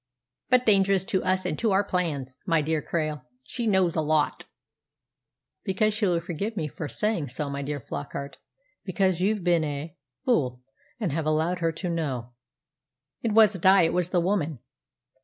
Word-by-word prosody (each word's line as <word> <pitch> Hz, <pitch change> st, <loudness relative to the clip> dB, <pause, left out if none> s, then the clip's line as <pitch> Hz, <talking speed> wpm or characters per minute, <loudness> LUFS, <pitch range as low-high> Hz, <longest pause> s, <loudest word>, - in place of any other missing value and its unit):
"But 250 Hz, -1 st, +4 dB
dangerous 195 Hz, -3 st, +4 dB
to 190 Hz, -1 st, -1 dB
us 185 Hz, 0 st, +1 dB
and 150 Hz, -, -2 dB
to 230 Hz, -, +2 dB
our 195 Hz, 0 st, +3 dB
plans, 145 Hz, -9 st, -2 dB
my 165 Hz, -3 st, +3 dB
dear 155 Hz, 0 st, 0 dB
Krail. 155 Hz, -3 st, -2 dB, 0.2 s
She 235 Hz, -, -4 dB
knows 190 Hz, -5 st, +2 dB
a 160 Hz, -, +2 dB
lot." 155 Hz, -1 st, 0 dB, 1.2 s
"Because 210 Hz, +2 st, 0 dB
well, 180 Hz, -5 st, +2 dB
forgive 185 Hz, +6 st, -4 dB
me 155 Hz, -, -1 dB
for 150 Hz, +1 st, -6 dB
saying 210 Hz, -2 st, -1 dB
so, 140 Hz, +3 st, -4 dB
my 140 Hz, 0 st, -3 dB
dear 145 Hz, +1 st, -3 dB
Flockart 130 Hz, -, -6 dB, 0.5 s
because 185 Hz, -1 st, 0 dB
you've 205 Hz, 0 st, +1 dB
been 170 Hz, -2 st, +3 dB
a 150 Hz, +1 st, -4 dB, 0.3 s
fool, 125 Hz, -, +1 dB, 0.4 s
and 205 Hz, -8 st, -1 dB
have 155 Hz, +1 st, -2 dB
allowed 160 Hz, +4 st, +1 dB
her 165 Hz, -1 st, +1 dB
to 180 Hz, +3 st, -5 dB
know." 130 Hz, -8 st, -3 dB, 0.9 s
"It 225 Hz, -2 st, -1 dB
wasn't 210 Hz, -5 st, +5 dB
I; 190 Hz, -1 st, +7 dB
it 165 Hz, -, +1 dB
was 180 Hz, -1 st, 0 dB
the 180 Hz, -, +2 dB
woman." 170 Hz, -5 st, 0 dB
170 Hz, 170 wpm, -26 LUFS, 150-195 Hz, 1.2 s, I